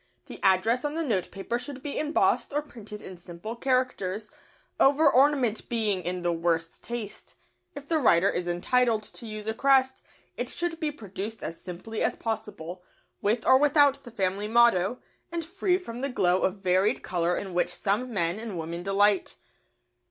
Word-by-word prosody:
The - - -10
address 210 +6 +3
on 295 +1 -2
the 330 - -1
notepaper 210 - -2
should 270 0 -8
be 290 - -3
embossed 305 +1 +1
or 295 +1 0
printed 215 -7 -10
in 185 - -9
simple 175 +6 -8
characters, 235 -6 -1 0.5
over 285 +3 +5
ornament 265 -4 +3
being 215 -5 0
in 180 0 -3
the 175 -1 +1
worst 165 0 -1
taste. 235 -4 -7 0.4
If 285 0 -9
the 320 0 +2
writer 190 - +4
is 175 -3 -1
entitled 220 +6 +1
to 230 - -10
use 215 -1 -6
a 220 - -1
crest, 265 +1 +3 0.4
it - - -3
should 345 -1 -3
be 310 -3 -1
produced 215 -4 -7
as 165 - -5
simply 190 +5 -6
as - - +1
possible, 185 -6 -5 0.4
with 220 +3 0
or 260 0 +6
without 285 -1 +4
the 245 - -10
family 200 -2 -1
motto, 235 -2 +4 0.3
and 335 -1 -3
free 365 +1 +1
from 245 -10 -8
the 275 - -1
glow 180 -7 +2
of 190 +1 -1
varied 185 +2 +2
colour 175 0 0
in 195 -2 -5
which 175 - +1
some 220 +6 -1
men 175 -2 0
and 220 -5 -5
women 170 +1 -4
delight. 195 +1 +2
220 Hz, 175 wpm, -27 LUFS, 185-265 Hz, 0.5 s, or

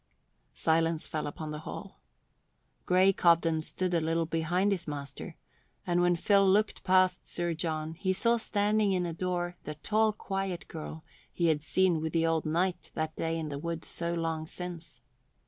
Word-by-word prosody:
Silence 165 0 +1
fell 155 -1 -3
upon 155 +1 -6
the 150 - -5
hall. 155 - -8 0.9
Grey 185 +2 +5
Cobden 165 -2 +3
stood 180 +3 -1
a 170 - +2
little 165 +1 0
behind 170 +5 +1
his 180 -4 -1
master, 140 -2 -6 0.5
and 175 0 +2
when 175 0 +4
Phil 200 +3 +4
looked 200 +2 +2
past 185 -1 +3
Sir 175 -1 0
John 160 -1 -3
he 185 +3 -1
saw 235 +5 +2
standing 210 -1 +1
in 180 -1 0
a 170 - -3
door 175 0 -2
the 150 - -6
tall, 215 +7 +2
quiet 195 -3 -4
girl 155 0 -7 0.3
he 170 -1 +1
had 150 -2 +1
seen 175 0 +2
with 160 0 -3
the 165 -1 +2
old 165 -1 +1
knight 175 +3 0
that 155 0 -2
day 165 0 -1
in 160 -2 -3
the 140 -1 -4
wood 170 +1 -4
so 170 0 -1
long 165 -1 -2
since. 170 -7 -7
170 Hz, 175 wpm, -30 LUFS, 160-185 Hz, 0.9 s, Grey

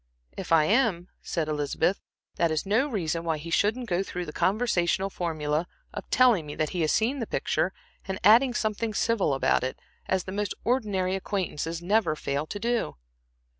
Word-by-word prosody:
"If 190 - -7
I 165 -2 +6
am," 200 -4 +2
said 165 -3 -2
Elizabeth, 150 +5 0 0.4
"that 170 - +2
is 155 +2 -1
no 220 +8 +2
reason 170 - -2
why 165 -2 0
he 165 +3 -8
shouldn't 220 +8 +1
go 180 -2 +1
through 180 -2 -4
the 150 - -8
conventional 195 -3 +1
formula 155 -2 -2 0.3
of - - -7
telling 235 -11 +4
me 145 - -6
that 155 -1 -1
he 180 - -2
has 155 - +2
seen 250 +6 +1
the 230 - -3
picture, 185 - 0 0.4
and 190 -1 -3
adding 240 +5 +6
something 215 0 -1
civil 225 -11 +1
about 135 - +2
it, 130 - -3 0.3
as 190 -1 +1
the 185 - -7
most 205 0 -2
ordinary 205 -7 0
acquaintances 170 -4 -3
never 200 -3 +2
fail 145 0 -2
to 205 - -5
do." 235 - -1
185 Hz, 180 wpm, -27 LUFS, 165-220 Hz, 0.4 s, I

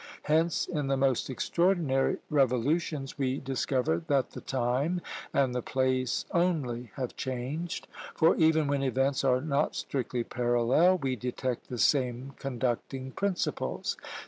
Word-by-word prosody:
Hence, 160 +2 +2
in 150 -5 -2
the 135 0 +1
most 135 -2 +1
extraordinary 165 -1 +1
revolutions 140 +2 +1
we 130 -1 0
discover 130 - 0
that 140 -3 +1
the - - -8
time 130 +7 0 0.3
and 135 -3 +2
the 125 - -1
place 130 0 0
only 145 - 0
have 130 -3 -4
changed; 135 +6 -4 0.3
for 160 - +4
even 160 -1 +4
when 140 -1 0
events 135 +1 +1
are 130 -1 +3
not 145 0 0
strictly 125 -2 -2
parallel, 120 +10 +3
we 135 -5 -1
detect 125 +1 -3
the 125 - -4
same 130 +1 +1
conducting 130 0 -2
principles. 195 +3 -1
135 Hz, 130 wpm, -29 LUFS, 125-150 Hz, 0.3 s, for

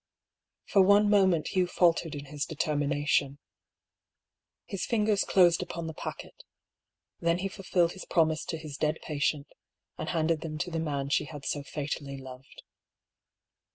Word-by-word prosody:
For 200 - +4
one 205 +2 +5
moment 190 -6 +3
Hugh 185 -1 +1
faltered 170 -3 +2
in 145 0 -7
his 145 0 -4
determination. 145 -2 0 1.3
His 195 -3 -4
fingers 210 -3 +2
closed 175 -2 +4
upon 170 -2 -5
the 160 - -5
packet; - - -8 0.8
then 170 0 +2
he 190 +2 -2
fulfilled 180 -3 0
his 190 - -9
promise 160 -2 +2
to 165 - -3
his 155 -3 -8
dead 155 +1 0
patient, 145 -1 -1 0.5
and 155 - -3
handed 160 -1 +1
them 155 -2 -5
to 175 +3 -3
the 165 - -2
man 140 -3 -2
she 145 - +2
had 145 -2 -9
so 145 - -1
fatally 140 -1 -5
loved. 130 0 -12
160 Hz, 150 wpm, -29 LUFS, 145-180 Hz, 1.3 s, one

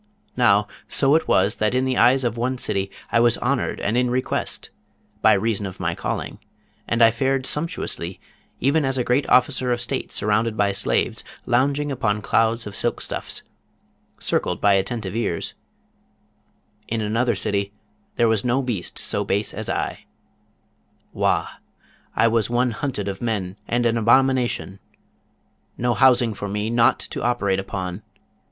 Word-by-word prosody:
Now, 105 -4 +4 0.2
so 135 0 +3
it 160 - +2
was, 100 +4 +2
that 110 +3 +1
in 130 +1 +2
the 130 -1 0
eyes 130 +2 +4
of 120 -1 -1
one 125 +2 -1
city 95 -5 -2 0.2
I 115 - +4
was 120 0 +4
honoured 135 +1 -1
and 105 - -1
in 125 0 +2
request, 130 +1 -2 0.5
by - - +6
reason 105 0 0
of 95 - -9
my - - -1
calling, - - -4 0.5
and 115 0 +3
I 115 - +7
fared 130 +3 0
sumptuously, 150 - -3 0.4
even 145 +3 +2
as 135 -1 0
a 125 - +1
great 125 +4 +1
officer 125 0 +3
of 120 - 0
state 130 +2 -3
surrounded 110 +1 0
by 100 -1 +2
slaves, 100 +1 -1 0.2
lounging 140 +4 +1
upon 105 -5 -1
clouds 115 +2 +1
of 105 -1 -7
silk - - +1
stuffs, - - -6 0.8
circled - - -1
by 100 -1 +4
attentive 100 +1 -1
ears: 100 -8 -2 1.3
in 115 - -2
another 115 +3 +1
city 100 0 -1 0.4
there 120 - +3
was 110 -3 +1
no 125 +2 +1
beast 115 -8 -3
so - - -1
base 100 +2 -1
as - - -5
I. - - -3 1.1
Wah! - - +1 0.7
I 115 - +4
was 115 -1 +1
one 120 +1 +1
hunted 110 -3 -3
of 95 -1 -4
men 100 -6 -2
and 120 0 0
an 115 0 +2
abomination; 120 -4 +2 1.0
no 120 0 +1
housing 120 -2 +4
for 100 0 -5
me, 105 +2 -2
nought 120 +2 +4
to - - -6
operate 100 -6 +1
upon. 95 0 -5
115 Hz, 160 wpm, -22 LUFS, 105-125 Hz, 1.3 s, I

